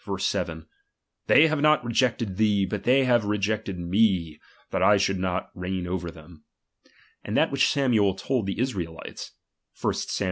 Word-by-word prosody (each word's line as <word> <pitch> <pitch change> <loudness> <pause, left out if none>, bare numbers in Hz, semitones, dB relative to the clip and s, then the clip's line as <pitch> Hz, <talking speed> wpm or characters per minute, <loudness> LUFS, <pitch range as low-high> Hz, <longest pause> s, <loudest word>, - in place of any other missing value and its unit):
7): - - -2 0.6
Tfiey 160 - +6
have 155 -2 -1
not 150 -4 +3
re 120 - -3
jected 115 -5 0
thee, 105 -2 +2
hut 95 +1 -5
theij 130 +2 +4
hare 120 -2 +4
rejected 105 -1 -2
me, 90 -3 +1 0.3
that - - -1
I 105 - +5
should 95 0 0
•3tot 90 -1 -2
reign 90 0 -4
over 90 -1 -3
them; 80 0 -15 0.8
and - - -2
that - - +2
which 135 -1 +2
Samuel 115 -9 +2
told 120 0 -2
the 100 - -3
Israelites 90 -10 -5 0.5
(1 - - 0
Sam. - - -4
100 Hz, 165 wpm, -25 LUFS, 90-120 Hz, 0.8 s, Tfiey